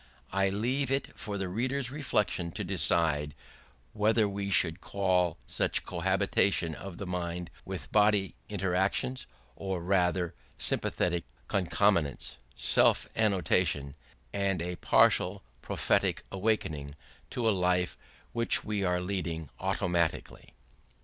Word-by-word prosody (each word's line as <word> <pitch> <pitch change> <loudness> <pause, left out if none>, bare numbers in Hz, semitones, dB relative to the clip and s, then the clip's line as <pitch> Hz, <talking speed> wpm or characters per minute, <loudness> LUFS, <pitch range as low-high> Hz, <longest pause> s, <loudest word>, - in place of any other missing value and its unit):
I 95 0 +2
leave 125 +7 0
it 135 +1 0
for 105 -1 -5
the 95 -1 -2
reader's 125 +6 -1
reflection 105 - 0
to - - -3
decide 75 -3 +1 0.6
whether 110 +1 +3
we 100 0 -3
should 85 -2 +2
call 90 -4 +1
such - - 0
cohabitation 85 -5 +1
of 90 +2 -8
mind 90 -1 -3
with 90 -6 -6
body 105 -2 +3 0.2
interaction, 95 +5 0 0.4
or 95 -2 -3
not 85 - -8
rather 90 -2 +2 0.2
sympathetic 85 -1 0 0.2
concomitance, 90 -4 +1 0.2
self - - +4
annotation, 90 -8 +1 0.4
and 100 -2 0
a 90 +1 -3
partial 95 +2 +3 0.2
prophetic - - +1
awakening 80 -9 -1 0.3
to 120 -2 -1
a - - +5
life 90 -1 +1 0.4
which 115 0 +2
we 105 -2 -1
are 90 -1 +1
leading 85 -5 -3
automatically. 90 -3 -1
95 Hz, 115 wpm, -30 LUFS, 85-105 Hz, 0.6 s, a